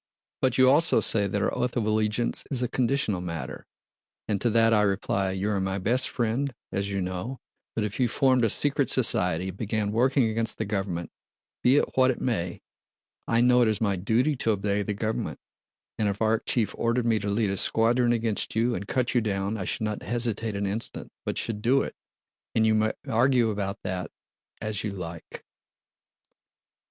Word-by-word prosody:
But 130 -2 +2
you 130 0 +6
also 150 +5 +5
say 100 -2 +1
that 100 +1 -1
our - - 0
oath 125 0 -1
of 115 - 0
allegiance 110 +2 +1
is 130 -3 +2
a - - +1
conditional 120 -7 0
matter, 85 -6 -6 0.6
and 105 -3 -1
to 120 - +2
that 115 0 +4
I 105 - +4
reply: 100 -1 0
'You 95 +3 -1
are 100 -2 0
my 95 0 -1
best 120 +7 +1
friend, 120 +3 -1 0.2
as 100 +1 -2
you 100 -1 -2
know, 95 +8 -4 0.4
but 110 - 0
if 105 +3 -4
you 125 - +3
formed 130 +1 +2
a 115 - +3
secret 140 +4 +3
society 90 -7 +1
and 95 - -9
began 105 -1 -1
working 130 +2 +3
against 110 0 0
the 110 - -2
government—be 95 +5 -2
it - - 0
what 130 0 +5
it 130 - -1
may—I 115 +2 -4
know 125 0 +5
it 120 - +4
is 110 -1 0
my 100 -3 +1
duty 115 +10 +1
to 115 - -1
obey 100 -1 +1
the 105 0 -3
government. 110 +2 -3 0.6
And 105 -2 +2
if 100 - -3
Arakchéev 110 +1 0
ordered 115 +1 +1
me 115 -2 +2
to 100 0 -3
lead 100 0 +1
a - - -1
squadron 120 +4 +2
against 115 -3 -1
you 115 +2 +2
and 100 -1 -4
cut 125 -2 0
you 120 - +3
down, 100 -1 -1
I 100 -4 -4
should - - -2
not 105 -1 -2
hesitate 115 -2 -2
an 100 0 -1
instant, 100 +4 -3
but - - -2
should 110 -3 -2
do 130 +5 +3
it.' - - -6 0.6
And 110 - +3
you 110 - +4
may 110 0 +2
argue 120 0 +3
about 100 -1 -4
that 90 -1 -3 0.5
as 110 -2 -2
you 105 -2 -3
like!" 85 -3 -8
110 Hz, 190 wpm, -26 LUFS, 100-120 Hz, 0.6 s, you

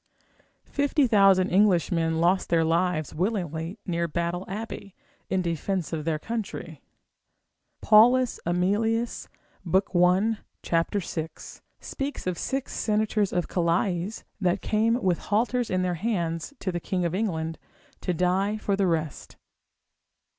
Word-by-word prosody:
Fifty 285 0 +1
thousand 195 -4 +4
Englishmen 170 -4 +2
lost 180 +3 +2
their 165 -1 +3
lives 165 -1 0
willingly 175 -2 -2
near 170 -2 -1
Battle 170 +3 -2
Abbey, 200 -1 -6 0.3
in 190 -1 +1
defence 170 +1 -2
of 155 -2 -3
their 160 -2 0
country. 225 +6 -5 1.0
P. - - -11
Aemilius 225 -1 +3 0.4
l. 190 0 +1
6. 160 -1 -7 0.2
speaks 280 +1 -5
of 180 -2 -2
six 270 -1 -3
senators 215 -1 0
of 175 -1 -1
Calais, 175 +1 0 0.3
that 185 -1 0
came 225 +2 +2
with 180 -3 +2
halters 235 +3 0
in 185 0 0
their 180 -1 0
hands 175 - -2
to 185 - -3
the 175 - -3
king 180 +1 -2
of 170 - -1
England, 165 -6 -2 0.4
to - - -1
die 185 +4 +1
for 205 -2 -1
the 195 -1 +1
rest. 160 -4 -3
185 Hz, 125 wpm, -26 LUFS, 170-215 Hz, 1.0 s, thousand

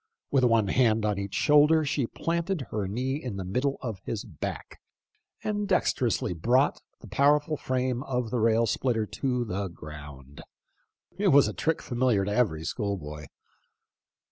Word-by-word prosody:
With 135 -2 +3
one 115 -4 +3
hand 110 -3 +3
on 105 -2 0
each 100 -1 -5
shoulder, 150 +1 +5
she 135 -3 0
planted 170 +4 -2
her 105 -3 -2
knee 130 +8 -2
in 120 -6 -5
the 95 - -4
middle 130 +9 -1
of 110 -6 -5
his 115 +2 -4
back, 85 - -7 0.6
and 205 -1 -1
dexterously 130 - +1
brought 125 - +2 0.2
the - - -11
powerful 150 +2 +2
frame 130 -2 -1
of 125 -4 -2
the 125 - 0
rail 115 +1 +3
splitter 115 -1 0
to 125 +2 -2
the 100 -1 -3
ground. 75 -4 -11 0.8
It 205 - +2
was 140 -5 +6
a - - -3
trick 160 0 -1
familiar 120 -5 +1
to 105 - -2
every 90 -11 +1
schoolboy. 75 - -4
120 Hz, 155 wpm, -27 LUFS, 100-140 Hz, 0.8 s, was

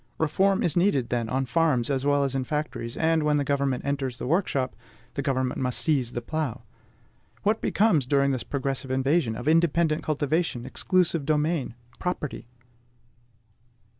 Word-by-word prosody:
Reform 190 +5 +2
is 165 - +1
needed, 175 -10 +2
then, 115 -2 -1
on 130 +2 0
farms 145 -4 +1
as 135 -1 0
well 145 0 +3
as 135 -1 -1
in 135 -1 -1
factories; 150 -5 -4
and, 160 0 +2
when 150 -1 +2
the 145 - +1
government 140 -2 0
enters 135 -3 -2
the - - -5
workshop, 140 -4 0 0.4
the 140 - -2
government 130 -2 -1
must 125 -1 0
seize 135 -7 +1
the 120 - -4
plough! 155 -3 -3 0.8
What 215 +2 +1
becomes, 180 - +2
during 140 0 +3
this 130 -3 -1
progressive 135 -1 -3
invasion, 130 -1 +1
of 120 +4 -6
independent 165 -1 +3
cultivation, 150 -3 -1
exclusive 170 +3 +1
domain, 150 -3 0 0.2
property? 165 -8 -4
140 Hz, 155 wpm, -26 LUFS, 130-160 Hz, 0.8 s, well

